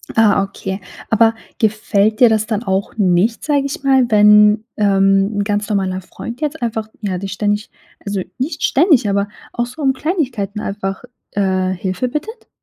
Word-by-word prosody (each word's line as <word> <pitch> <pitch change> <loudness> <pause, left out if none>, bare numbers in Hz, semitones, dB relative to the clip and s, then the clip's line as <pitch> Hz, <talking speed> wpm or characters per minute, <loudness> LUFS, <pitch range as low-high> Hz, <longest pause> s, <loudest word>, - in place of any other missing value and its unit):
Ah, 220 -3 +4
okay. 195 0 -6 0.3
Aber 225 0 +4 0.2
gefällt 215 -1 +1
dir 245 - +7
das 215 -1 +1
dann 220 -1 -2
auch 190 -2 -1
nicht, 200 +3 +2
sag 290 -2 +1
ich 280 0 -5
mal, 265 -2 +4
wenn, 210 0 +6
ähm, 195 0 +2
'n 205 - +1
ganz 205 +1 -2
normaler 190 -2 -1
Freund 235 - -9
jetzt 305 0 -3
einfach, 220 -2 -2
ja, 195 -4 -2
dich 195 +2 -5
ständig 205 +2 -1 0.4
also, 200 -1 -2 0.2
nicht 275 +7 -3
ständig, 290 - +3
aber 200 0 0 0.3
auch 240 - -1
so 300 +6 -10
um 270 -2 +2
Kleinigkeiten 250 - -2
einfach, 195 0 -4 0.3
äh, 185 -2 0
Hilfe 185 +6 -2
bittet? 440 - -6
210 Hz, 165 wpm, -17 LUFS, 195-240 Hz, 0.4 s, dir